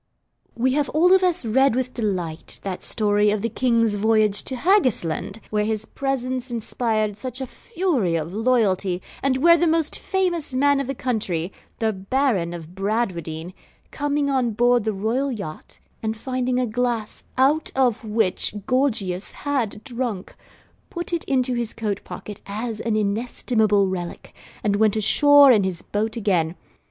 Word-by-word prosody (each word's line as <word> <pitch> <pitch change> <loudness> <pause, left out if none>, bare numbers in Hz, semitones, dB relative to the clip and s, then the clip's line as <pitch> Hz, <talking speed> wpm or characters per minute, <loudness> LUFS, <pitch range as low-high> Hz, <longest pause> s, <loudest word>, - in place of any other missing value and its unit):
We 255 +2 +1
have 290 -1 0
all 355 +4 +5
of 380 - +5
us 360 -7 +1
read 265 +2 +3
with 255 0 -2
delight 180 -8 -3
that 190 -2 -4
story 210 -1 +2
of 205 0 -1
the 230 - 0
King's 230 -2 +2
voyage 215 -1 +3
to 260 - -1
Haggisland, 245 - +1
where 210 -1 +1
his 220 0 -2
presence 260 -1 -3
inspired 225 -2 -1
such 255 +3 -6
a 265 - -3
fury 275 - -1
of 165 +2 -3
loyalty 205 -5 +1 0.2
and 270 -1 +1
where 335 +4 +6
the 345 - +3
most 320 -1 +1
famous 350 -8 -1
man 285 +1 +3
of 275 - -2
the 275 - -3
country 200 -8 -2 0.2
the 220 -1 0
Baron 195 -2 0
of 170 -1 -8
Bradwardine 185 -5 -2 0.4
coming 290 0 -1
on 255 -4 +1
board 240 0 +3
the 220 - +1
royal 230 +8 -1
yacht, 200 -10 -7 0.2
and 220 0 -2
finding 255 +1 -1
a 255 - +1
glass 235 -1 -2
out 285 +4 +3
of 250 -4 +2
which 210 -3 0
Gorgius 215 -8 0
had 250 -7 -1
drunk, 240 -7 -4 0.6
put 345 0 -5
it 340 - 0
into 255 -2 +1
his 235 -2 -2
coatpocket 210 -1 -5
as 215 +2 -4
an 225 -2 -1
inestimable 215 -1 +1
relic, 175 -2 -5 0.3
and 205 -1 +1
went 215 -1 +3
ashore 285 +6 +6
in 215 -5 +4
his 185 -3 -3
boat 220 +2 -2
again. 180 -6 +1
230 Hz, 155 wpm, -23 LUFS, 205-260 Hz, 0.6 s, where